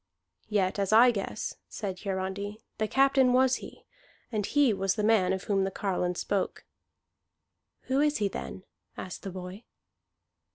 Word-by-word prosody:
"Yet, 200 -2 +1
as 195 0 0
I 235 +3 +7
guess," 200 -4 -4 0.2
said 190 -4 -5
Hiarandi, 195 +1 -3 0.2
"the 215 - +1
captain 270 0 +4
was 260 0 +4
he, - - -12 0.5
and 215 -3 -1
he 285 -5 +3
was 195 -1 0
the 210 - -1
man 210 -4 +3
of 190 -1 -2
whom 195 -2 +1
the 190 - 0
carline 180 -2 -1
spoke." 195 +2 -2 1.2
"Who 265 +1 0
is 295 0 +2
he, 205 - +1
then?" 190 -1 -6 0.3
asked 185 - -7
the 195 - -5
boy. 185 +3 -8
200 Hz, 155 wpm, -29 LUFS, 190-230 Hz, 1.2 s, I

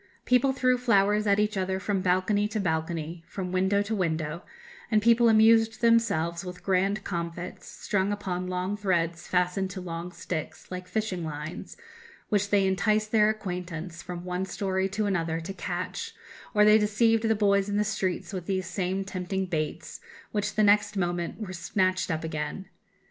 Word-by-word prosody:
People 250 +2 +4
threw 255 -1 +2
flowers 210 -3 +3
at 200 0 +4
each 210 +1 +1
other 190 0 -1
from 195 0 -1
balcony 185 +3 +2
to 215 0 -3
balcony, 165 -1 -2
from 185 -2 -5
window 190 +2 +2
to 210 +2 -3
window; 160 -4 -1 0.5
and 215 - +4
people 230 +2 +5
amused 225 0 +5
themselves 200 -8 +2
with 180 -1 -8
grand 195 +2 +1
comfits, 170 -1 -5
strung 195 0 -1
upon 185 -3 -3
long 185 +2 -2
threads 170 -5 -1
fastened 180 +1 +1
to 185 - -6
long 175 0 -5
sticks, 165 -1 -6
like 180 0 -6
fishing 185 -2 -2
lines, 155 0 -6 0.5
which 205 -1 +1
they 200 -1 +3
enticed 215 +3 +1
their 215 -1 +5
acquaintance, 180 -5 -5
from 175 0 -7
one 180 +1 -2
story 190 0 -1
to 210 +2 -1
another, 165 -5 0
to 170 +4 -6
catch; 190 - -4 0.4
or 210 0 +6
they 215 +1 +7
deceived 225 +2 +2
the 220 - +3
boys 200 -1 +2
in 205 - 0
the 210 - +3
streets 200 -2 -2
with 180 -3 -5
these 190 -2 -1
same 185 +1 -2
tempting 190 0 -3
baits, 160 -2 -4 0.3
which 210 0 -2
the 215 - +3
next 205 0 +4
moment 175 0 -2
were 200 -4 -5
snatched 185 +1 0
up 160 -2 -2
again. 155 +4 -4
190 Hz, 170 wpm, -27 LUFS, 180-210 Hz, 0.5 s, they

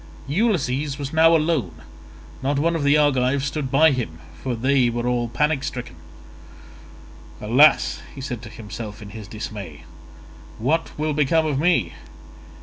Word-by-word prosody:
Ulysses 145 - 0
was 140 0 -5
now 165 +1 +6
alone; 135 - -1 0.6
not 140 +2 0
one 165 +4 +1
of 165 - -1
the 145 +1 +4
Argives 135 -2 +2
stood 140 -1 -3
by 155 +4 +5
him, 115 - -3 0.2
for 130 -2 -2
they 130 +1 +2
were 120 0 -3
all 120 -1 0
panic 150 +3 0
stricken. 125 -9 -5 1.4
"Alas," 125 +8 +4 0.2
said 130 -3 -5
he - - -15
to 115 - -10
himself 105 -1 -8
in 100 - -10
his 110 -2 -9
dismay, 105 -7 -7 0.7
"what 155 +9 0
will 155 0 -1
become 155 +2 +2
of 145 -3 -1
me? 175 +2 +2
135 Hz, 145 wpm, -22 LUFS, 120-150 Hz, 1.4 s, now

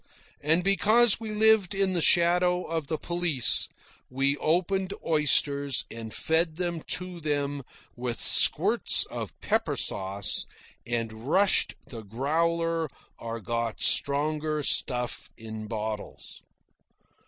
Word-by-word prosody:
And 160 +4 +1
because 215 +4 +4
we 225 -1 -6
lived 215 -2 +3
in 195 -1 +1
the 175 - 0
shadow 180 +2 +3
of 160 -3 -4
the 155 - -2
police, 165 -10 0 0.4
we 135 +2 0
opened 185 +5 -1
oysters 145 -3 +2
and 115 -1 -8
fed 160 +3 0
them 175 -1 -3 0.2
to 180 -1 -8
them 145 -2 -2 0.3
with 120 -1 -4
squirts - - +4
of - - -7
pepper - - -1
sauce, 95 0 0 0.4
and 115 -2 -2 0.2
rushed 195 +4 +3
the 120 -5 -9
growler 165 +8 -1 0.3
or 115 0 -6
got 115 0 -3
stronger 150 +1 +1
stuff 125 -3 0
in 110 -1 -8
bottles. 110 -1 -6
155 Hz, 115 wpm, -27 LUFS, 120-175 Hz, 0.4 s, because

